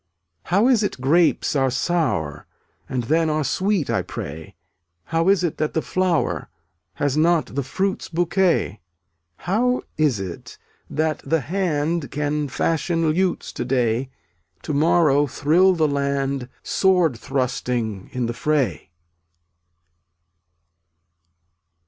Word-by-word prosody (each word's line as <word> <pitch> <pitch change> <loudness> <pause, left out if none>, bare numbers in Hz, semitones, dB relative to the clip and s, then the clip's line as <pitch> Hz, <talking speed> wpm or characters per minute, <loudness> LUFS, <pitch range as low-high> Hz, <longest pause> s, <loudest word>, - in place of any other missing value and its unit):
318 - - -15 0.2
How 260 - +5
is 225 - +2
it 205 - -2
grapes 155 +5 +2
are 135 -2 +2
sour, 130 - -1 0.4
And 125 -2 -1
then 160 +6 +2
are 155 0 0
sweet, 190 +3 0
I - - +1
pray? 80 +2 -7 0.5
How 165 - +1
is 195 -2 +3
it 170 - -1
that 155 - -1
the 160 - +2
flower 185 -3 0 0.5
Has 145 -1 0
not 160 -1 +2
the 140 - 0
fruit's 190 +9 -2
bouquet? 175 - +1 0.7
How 245 +7 +1 0.2
is 145 -9 +2
it 95 -3 -7 0.3
that 155 0 -1
the 165 -1 +1
hand 165 -3 -1
Can 150 +1 -1
fashion 165 +3 0
lutes 185 +2 -1
to - - -3
day, 125 0 0 0.5
To - - -3
morrow 145 -1 +3
thrill 170 +8 +3
the 160 -3 +2
land 140 -2 -1
Sword 180 -7 +2
thrusting 125 -5 -2
in 125 -1 -2
the 120 - -2
fray? 145 -6 -1
150 Hz, 125 wpm, -22 LUFS, 135-175 Hz, 0.7 s, How